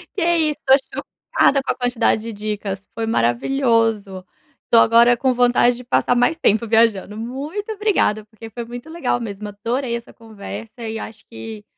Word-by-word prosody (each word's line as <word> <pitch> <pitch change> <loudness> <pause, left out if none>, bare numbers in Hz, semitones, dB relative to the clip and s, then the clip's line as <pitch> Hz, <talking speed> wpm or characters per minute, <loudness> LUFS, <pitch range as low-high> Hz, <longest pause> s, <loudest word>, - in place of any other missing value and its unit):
E 390 - -2
é 340 0 +3
isso, 305 -2 0
estou 265 0 +2 0.3
chocada 275 -1 +4
com - - 0
a - - -4
quantidade 245 -3 +1
de 230 0 -6
dicas, 205 -2 -5
foi 230 - -3
maravilhoso. 225 - +1 0.4
Estou 230 - +5
agora 235 +2 +6
com 260 +1 +1
vontade 245 0 +3
de 250 - -10
passar 245 0 +1
mais 245 +7 +2
tempo 220 -6 +2
viajando. 220 -2 +2
Muito 290 - -5
obrigada, 395 - +1
porque 220 +1 -12
foi 235 +2 -6
muito 245 +5 -9
legal 320 -7 -1
mesmo, 210 -3 -6
adorei 235 +4 -3
essa 235 - -8
conversa 225 +1 -10
e 220 0 -4
acho 220 0 -9
que 225 -2 -9
230 Hz, 175 wpm, -20 LUFS, 215-255 Hz, 0.4 s, agora